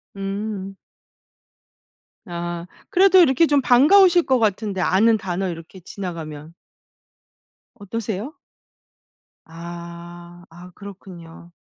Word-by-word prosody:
음. 195 0 -5 1.5
아 175 0 -6 0.2
그래도 380 -1 +5
이렇게 330 -1 +4
좀 290 -2 +2
반가우실 350 +9 +5
것 260 -3 +2
같은데 205 -2 -1
아는 220 +5 +3
단어 190 -1 -3
이렇게 165 +3 -9
지나가면. 165 -4 -8 1.2
어떠세요? 215 +5 -5 1.1
아. 170 +1 -11
아 175 +2 -14
그렇군요. 175 -4 -12
190 Hz, 195 characters per minute, -21 LUFS, 175-230 Hz, 1.5 s, 그래도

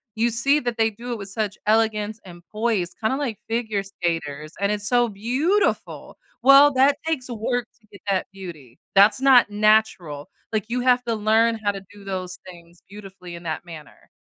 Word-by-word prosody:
you 230 +2 +1
see 275 +6 +2
that 240 -2 -3
they 225 0 +3
do 235 +3 -8
it - - -4
with 200 - -7
such 205 0 -3
elegance 220 0 +1
and 175 -2 -12
poise, 215 -5 -1
kinda 220 +4 +1
like 250 -8 -3
figure 220 -4 -1
skaters, 165 -6 -4
and 200 +1 +1
it's 205 -1 -2
so 245 -1 +3
beautiful. 260 - -1 0.3
Well, 275 +2 +7
that 275 +2 +4
takes 300 -6 -2
work 240 +1 -2
to 215 - -28
get 200 - -14
that 190 -2 0
beauty. 155 -10 -11 0.2
That's 205 +6 +5
not 260 -5 +6
natural, 205 -8 +1 0.2
like, 215 -1 0
you 250 +1 -1
have 250 0 +3
to 230 - -1
learn 220 +2 +2
how 205 - +2
to 195 -1 -8
do 205 -1 -14
those 185 -2 -5
things 170 -1 -15
beautifully 190 -3 -11
in 170 - -10
that 160 -2 -4
manner. 160 -4 -13
215 Hz, 185 wpm, -23 LUFS, 190-240 Hz, 0.3 s, Well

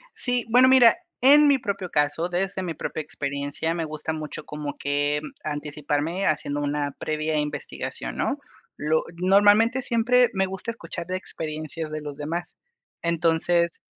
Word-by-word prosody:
Sí, 245 -2 +1
bueno, 250 +3 +6
mira, 255 -3 +7 0.2
en 290 +4 +8
mi 280 -1 +5
propio 200 -6 -4
caso, 150 +3 +1
desde 190 +2 -2
mi 170 -2 -3
propia 155 - -4
experiencia, 145 +2 -3
me 165 -1 -2
gusta 155 0 -4
mucho 155 -1 -6
como 150 -1 -6
que 145 +1 0 0.2
anticiparme 150 +4 -2
haciendo 145 -1 0
una 145 0 -1
previa 155 0 -1
investigación, 145 - -4
¿no? - - 0 0.4
Lo 155 +2 +1
normalmente, 205 +7 +4
siempre 245 +1 +3
me 190 0 +1
gusta 190 +4 -5
escuchar 170 -6 -7
de 185 - -2
experiencias 155 -2 -5
de 155 0 -4
los 145 -1 -7
demás. 165 +4 -4 0.4
Entonces, 170 0 +1
165 Hz, 145 wpm, -25 LUFS, 150-195 Hz, 0.4 s, en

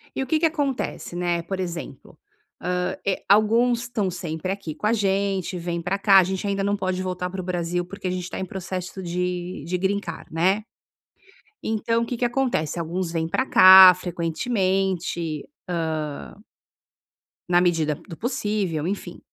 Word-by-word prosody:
E 270 - -1
o - - -8
que 310 +2 +2
que 330 - +2
acontece? 285 - -2
Né, 175 -1 0
por 190 +2 -4
exemplo, 170 -6 -6 0.4
hã, 180 0 -1
eh, 195 - -1
alguns 230 +3 +4
estão 230 -5 -2
sempre 170 0 -4
aqui 195 -6 -5
com 210 - -2
a 230 - +3
gente, 195 -3 0
vem 170 0 -3
pra 185 +3 -1
cá 195 -1 +6
a - - +5
gente 190 +2 -3
ainda 200 0 -1
não 200 +1 +1
pode 185 -1 -2
voltar 180 0 -3
pro 185 0 -5
Brasil, 175 -1 -2
porque 190 0 -6
a - - -1
gente 180 0 -4
tá - - -5
em 190 - -2
processo 185 0 -6
de 180 -1 -3
de 180 +2 -1
Green 195 +2 0
Card, 200 - -9
né. 190 +6 +2 1.0
Então, 230 +1 0
o - - -2
que 245 - -3
que 245 - -1
acontece? 240 - 0
Alguns 170 +1 -3
vêm 160 -1 -1
pra 260 +10 0
cá 185 0 +10
frequentemente, 180 - -1 0.8
hã 205 - -16 1.1
na 175 0 +5
medida 160 -4 +1
do 165 - -9
possível, 205 - -2
enfim. 190 -3 -5
185 Hz, 170 wpm, -24 LUFS, 175-200 Hz, 1.1 s, cá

